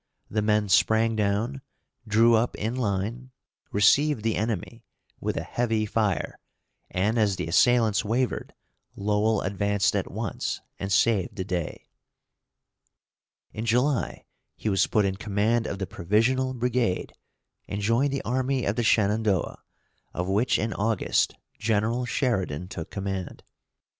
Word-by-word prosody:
The 105 - +1
men 105 0 +2
sprang 110 +4 +3
down, 110 +6 0 0.5
drew 115 +2 +5
up 115 +2 +2
in 110 +3 -2
line, 115 +2 -2 0.4
received 125 +5 +3
the 115 -1 +1
enemy, 110 -4 -3 0.4
with - - -2
a - - -2
heavy 115 -3 0
fire, 105 -5 -1 0.5
and 105 +5 0
as 105 -3 +2
the - - -3
assailants 110 +5 +3
wavered, 120 +4 -1 0.4
Lowell 105 +2 +1
advanced 100 +1 +1
at - - -1
once, - - -3 0.2
and 95 0 -4
saved 100 -2 +2
the 95 - -3
day. 90 -4 -4 1.7
In 110 - -4
July, 125 +4 0 0.3
he 110 - -3
was 95 -2 +2
put 105 -2 +2
in 95 -1 -1
command 110 +2 0
of 100 - -4
the 95 - -3
"Provisional 120 +10 +1
Brigade," 120 -5 -1 0.5
and 100 - -4
joined 115 +7 +2
the 140 - -2
army 130 +1 0
of 100 - -1
the 120 - +1
Shenandoah, 105 -4 +1 0.5
of 90 +1 -2
which 105 +6 +2
in 110 +1 -1
August 110 -1 +1 0.2
General 110 +3 0
Sheridan 95 - -1
took 85 -4 -6
command. 95 -2 -5
110 Hz, 135 wpm, -26 LUFS, 100-120 Hz, 1.7 s, drew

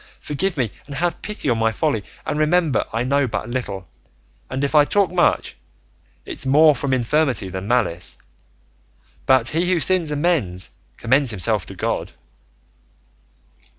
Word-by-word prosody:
Forgive 160 +5 -2
me 120 -6 0 0.2
and 140 - -7
have 175 +4 -1
pity 210 -7 -3
on 120 -3 +2
my 115 0 +2
folly, 115 -4 -1 0.2
and 150 - -2
remember 155 -1 +2
I 115 +2 -1
know 140 +1 +1
but 110 - -4
little, 100 -7 -4 0.6
and, 130 +1 -3
if 140 - -1
I 150 -1 +7
talk 195 +4 +2
much, 180 -1 +1 0.7
it's - - -4
more 150 +3 +6
from 140 +1 -3
infirmity 130 -4 +1
than 95 +1 -6
malice; 105 -8 0 1.1
but 130 -3 +4
he 175 +3 0
who 180 - +2
sins 175 0 +3
and 150 0 -2
mends 105 - 0 0.3
commends 130 +3 +2
himself 105 -1 0
to - - -9
God." - - -3
135 Hz, 150 wpm, -21 LUFS, 115-155 Hz, 1.1 s, I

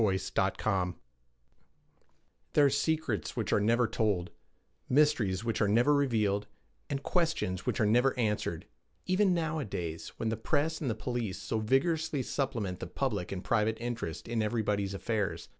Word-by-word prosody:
ROSITA 100 -3 +3 0.2
ELLEN 95 0 +2
MACKUBIN 90 -4 0 1.6
THERE 145 - +6
are - - +5
secrets 140 - 0
which - - -1
are - - +4
never 115 +4 +3
told, 105 -5 0 0.6
mysteries 125 -9 +3
which 115 -2 -1
are 105 - +4
never 120 +8 +4
revealed, 110 -8 +1 0.4
and 140 -1 -2
questions 160 - 0
which - - 0
are 110 - +4
never 125 +5 +3
answered, 105 -6 -1 0.4
even 185 0 +3
nowadays, 135 - -3
when 110 - -1
the 110 - -1
press 150 +7 0
and 140 - -1
the 110 - -1
police 115 -3 -3
so 110 - -2
vigorously 145 +5 +1
supplement 115 -10 -2
the - - -5
public 105 -10 -2
and 95 -1 -4
private 110 -1 +1
interest 120 -9 -4
in 115 -1 0
everybody's 105 -3 0
affairs. 105 -1 -2
115 Hz, 155 wpm, -31 LUFS, 100-140 Hz, 1.6 s, THERE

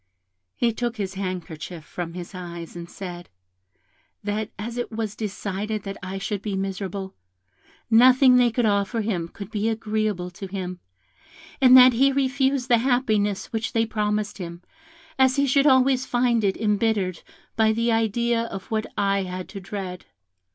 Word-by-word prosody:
He 235 -1 +1
took 240 +1 -3
his 195 -2 -3
handkerchief 180 -3 -5
from 170 -2 -6
his 180 +1 -8
eyes 170 -2 -8
and 170 0 -8
said, 175 -3 -8 0.9
that 210 +1 -2
as 230 +3 -5
it 240 - -3
was 215 -2 -3
decided 210 0 -3
that 195 -1 -5
I 185 +2 -5
should 195 +1 -3
be 205 -2 -3
miserable, 195 0 -4 0.7
nothing 250 +3 +6
they 245 -1 +5
could 235 +1 0
offer 205 +2 +1
him 190 -6 -2
could 200 +3 -10
be 215 0 0
agreeable 215 -5 -2
to 195 +2 -8
him, 185 -2 -5 0.8
and 255 -1 +9
that 255 0 +9
he 270 +4 +4
refused 270 -1 +1
the 240 -3 +4
happiness 220 -6 0
which 225 0 -2
they 225 0 +2
promised 210 -1 -2
him, 170 -1 -7 0.6
as 260 0 +5
he 280 0 +3
should 275 +2 +3
always 260 -1 +4
find 240 -2 +2
it 195 -1 +1
embittered 210 -4 0 0.3
by 220 -1 +4
the 230 +2 +1
idea 230 +1 +1
of 195 -3 -8
what 220 0 -1
I 200 -1 +2
had 185 -1 -5
to 200 - -7
dread. 185 -2 -6
210 Hz, 160 wpm, -24 LUFS, 190-235 Hz, 0.9 s, and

